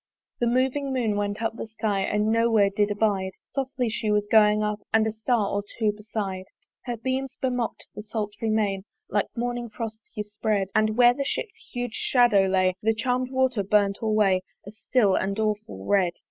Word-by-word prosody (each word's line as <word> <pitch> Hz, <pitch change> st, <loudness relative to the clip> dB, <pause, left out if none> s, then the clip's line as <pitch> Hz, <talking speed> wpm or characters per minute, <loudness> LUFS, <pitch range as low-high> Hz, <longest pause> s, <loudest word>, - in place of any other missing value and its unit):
The 240 Hz, -, +1 dB
moving 265 Hz, +3 st, +1 dB
Moon 235 Hz, -5 st, 0 dB
went 205 Hz, +2 st, -2 dB
up 225 Hz, -, -1 dB
the 230 Hz, -, -6 dB
sky 215 Hz, -2 st, -1 dB
And 210 Hz, +2 st, +1 dB
no 230 Hz, +1 st, +3 dB
where 205 Hz, -3 st, +4 dB
did 205 Hz, +1 st, +1 dB
abide: 200 Hz, -3 st, 0 dB, 0.2 s
Softly 265 Hz, -2 st, -2 dB
she 220 Hz, 0 st, -2 dB
was 210 Hz, 0 st, +2 dB
going 210 Hz, 0 st, +4 dB
up 210 Hz, 0 st, -1 dB
And 220 Hz, 0 st, +4 dB
a 220 Hz, -, 0 dB
star 220 Hz, -1 st, 0 dB
or 200 Hz, 0 st, -1 dB
two 215 Hz, -2 st, +2 dB
beside 205 Hz, -3 st, -5 dB, 0.4 s
Her 240 Hz, -2 st, -3 dB
beams 260 Hz, +2 st, -3 dB
bemock'd 250 Hz, -3 st, -2 dB
the -, -, -7 dB
sultry 210 Hz, 0 st, -4 dB
main 205 Hz, -3 st, +1 dB, 0.3 s
Like 205 Hz, 0 st, +1 dB
morning 240 Hz, 0 st, -2 dB
frosts 225 Hz, +6 st, -8 dB
yspread; 210 Hz, -1 st, -1 dB
But 215 Hz, 0 st, +2 dB
where 245 Hz, 0 st, +6 dB
the 275 Hz, -, -2 dB
ship's 405 Hz, -, -4 dB
huge 245 Hz, -2 st, -3 dB
shadow 235 Hz, -8 st, +3 dB
lay, 185 Hz, -1 st, +2 dB
The 225 Hz, +1 st, +2 dB
charmed 250 Hz, +3 st, 0 dB
water 260 Hz, -4 st, +1 dB
burnt 200 Hz, 0 st, +2 dB
alway 210 Hz, -4 st, +2 dB, 0.2 s
A 200 Hz, -, -8 dB
still 220 Hz, -2 st, +1 dB
and 195 Hz, +2 st, 0 dB
awful 210 Hz, -, -2 dB
red. 185 Hz, -, +2 dB
215 Hz, 185 wpm, -25 LUFS, 205-240 Hz, 0.4 s, where